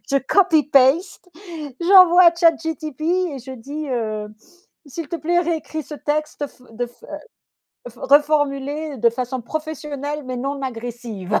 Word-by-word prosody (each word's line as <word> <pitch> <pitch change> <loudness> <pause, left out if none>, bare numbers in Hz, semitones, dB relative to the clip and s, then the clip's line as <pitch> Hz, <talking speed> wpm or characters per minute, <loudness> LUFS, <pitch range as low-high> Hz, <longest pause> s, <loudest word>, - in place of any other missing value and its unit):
je 275 - +3
copy 320 +1 +3
paste, 290 +7 +2 0.5
j'envoie 365 0 +7
à 340 0 +6
Chat 335 -1 +4
GTP 310 -3 -5
et 350 -4 0
je 260 +1 -9
dis, 285 +5 -7
heu: 215 -4 -2 0.6
«S'il 310 +2 -6
te 340 - -5
plaît, 345 +2 0
réécris 320 -2 -3
ce 300 - -8
texte 300 0 -2
f 250 - -23
de 240 +2 -3
f 240 - -22
heu, - - -14 0.8
refor 240 0 -9
reformulé 290 0 -2
de 235 - +4
façon 250 +1 -4
professionnelle 300 0 -5
mais 255 - -4
non 275 +2 -3
agressive» 230 -5 -4
290 Hz, 155 wpm, -21 LUFS, 255-320 Hz, 0.8 s, j'envoie